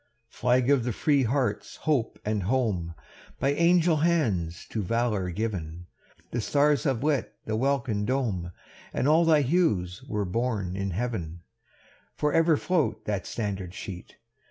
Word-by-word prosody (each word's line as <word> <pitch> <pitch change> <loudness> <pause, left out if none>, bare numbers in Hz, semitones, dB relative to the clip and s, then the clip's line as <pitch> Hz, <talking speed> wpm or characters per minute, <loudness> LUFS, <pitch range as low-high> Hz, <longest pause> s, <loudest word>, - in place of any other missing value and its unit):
V. - - -20
Flag 125 +2 +3
of 135 -4 +3
the 120 -1 -1
free 145 +5 +2
heart's 125 -3 -1
hope 140 -8 0
and 105 -1 0
home! 95 -6 0 0.4
By 135 +2 +2
angel 170 +1 +4
hands 110 - 0
to 110 - -1
valour 105 -2 0
given; 90 -4 -4 0.5
The 120 - -1
stars 145 +1 +2
have 130 -3 0
lit 150 -4 0
the 110 - -2
welkin 125 -4 0
dome, 110 -10 -1 0.4
And 130 - 0
all 160 +3 +5
thy 155 -2 +5
hues 130 - +1
were 105 -5 -1
born 100 -2 -1
in 100 0 -2
heaven. 90 -5 -4 0.7
For 150 0 0
ever 165 -1 +4
float 150 -13 0
that 100 -2 -2
standard 100 -4 -4
sheet! 90 -3 -8
115 Hz, 150 wpm, -27 LUFS, 95-140 Hz, 0.7 s, all